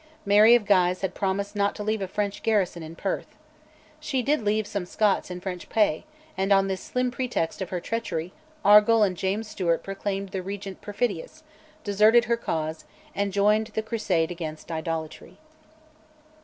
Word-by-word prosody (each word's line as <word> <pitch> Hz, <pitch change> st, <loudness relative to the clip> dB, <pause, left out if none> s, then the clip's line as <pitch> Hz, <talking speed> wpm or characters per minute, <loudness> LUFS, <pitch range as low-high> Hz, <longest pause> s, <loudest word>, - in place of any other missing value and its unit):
Mary 210 Hz, +3 st, +7 dB
of 235 Hz, -3 st, +1 dB
Guise 185 Hz, -2 st, +3 dB
had 190 Hz, -2 st, -2 dB
promised 200 Hz, +1 st, -2 dB
not 200 Hz, 0 st, +1 dB
to 210 Hz, -, -5 dB
leave 215 Hz, 0 st, -1 dB
a 190 Hz, -, -2 dB
French 205 Hz, +1 st, -3 dB
garrison 195 Hz, -6 st, +1 dB
in 160 Hz, +1 st, -9 dB
Perth. -, -, -4 dB, 0.6 s
She 300 Hz, -5 st, -2 dB
did 295 Hz, +2 st, +1 dB
leave 215 Hz, 0 st, 0 dB
some 200 Hz, -3 st, -4 dB
Scots 210 Hz, -1 st, +1 dB
in 180 Hz, 0 st, -5 dB
French 180 Hz, -2 st, -6 dB
pay, 210 Hz, -8 st, +1 dB, 0.3 s
and 190 Hz, +1 st, -1 dB
on 195 Hz, 0 st, +5 dB
this 190 Hz, -1 st, -3 dB
slim 250 Hz, 0 st, -1 dB
pretext 245 Hz, -10 st, -2 dB
of 185 Hz, -, -3 dB
her 180 Hz, -, -2 dB
treachery, 180 Hz, -5 st, -3 dB, 0.3 s
Argyll 210 Hz, +2 st, +7 dB
and 190 Hz, -3 st, +1 dB
James 195 Hz, +5 st, -2 dB
Stewart 175 Hz, -5 st, -1 dB
proclaimed 195 Hz, 0 st, -4 dB
the 190 Hz, -1 st, -4 dB
Regent 195 Hz, 0 st, -7 dB
perfidious, 210 Hz, -, -3 dB, 0.4 s
deserted 215 Hz, +4 st, +4 dB
her 235 Hz, +1 st, +2 dB
cause, 160 Hz, -7 st, -3 dB, 0.3 s
and 200 Hz, 0 st, -1 dB
joined 210 Hz, +2 st, +2 dB
the 220 Hz, 0 st, -3 dB
crusade 195 Hz, -7 st, 0 dB
against 160 Hz, -2 st, -6 dB
"idolatry." 160 Hz, -1 st, -5 dB
200 Hz, 170 wpm, -26 LUFS, 180-215 Hz, 0.6 s, Mary